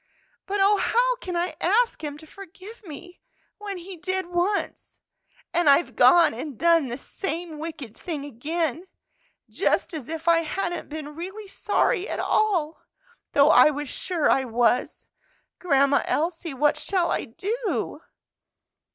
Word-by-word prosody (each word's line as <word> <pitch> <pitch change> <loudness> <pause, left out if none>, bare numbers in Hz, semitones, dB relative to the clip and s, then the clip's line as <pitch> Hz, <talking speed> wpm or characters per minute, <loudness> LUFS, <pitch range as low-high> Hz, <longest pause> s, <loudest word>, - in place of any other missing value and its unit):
But 400 +1 -1
oh, 400 +1 +4
how - - +2
can 365 -7 -6
I 350 +1 -1
ask 445 +1 +2
Him 295 -1 -5
to 315 - -14
forgive 395 +5 -13
me, 355 +1 -11 0.4
when 405 -2 -5
He 365 +2 -9
did 375 +2 -2
once, 355 +4 -2 0.6
and 345 -3 +3
I've 280 +5 +3
gone 340 -6 +6
and 255 +2 -7
done 335 -4 +3
the 240 0 -5
same 330 +1 -5
wicked 305 -8 -7
thing 305 -5 -5
again, 310 +5 -3 0.6
just - - 0
as 305 -5 -6
if 325 +1 -6
I 335 -1 +5
hadn't 345 +2 -3
been 300 -1 -7
really 385 +6 -7
sorry 390 +1 0
at - - -3
all, 350 -8 0 0.5
though 285 +2 +6
I 305 - +7
was 295 -1 -4
sure 345 -5 -1
I 270 - +3
was! 245 0 0 0.5
Grandma 280 -4 +3
Elsie, 330 -1 -2
what 295 +3 +2
shall 365 -3 0
I - - -1
do?" 430 - -3
335 Hz, 145 wpm, -25 LUFS, 295-380 Hz, 0.6 s, I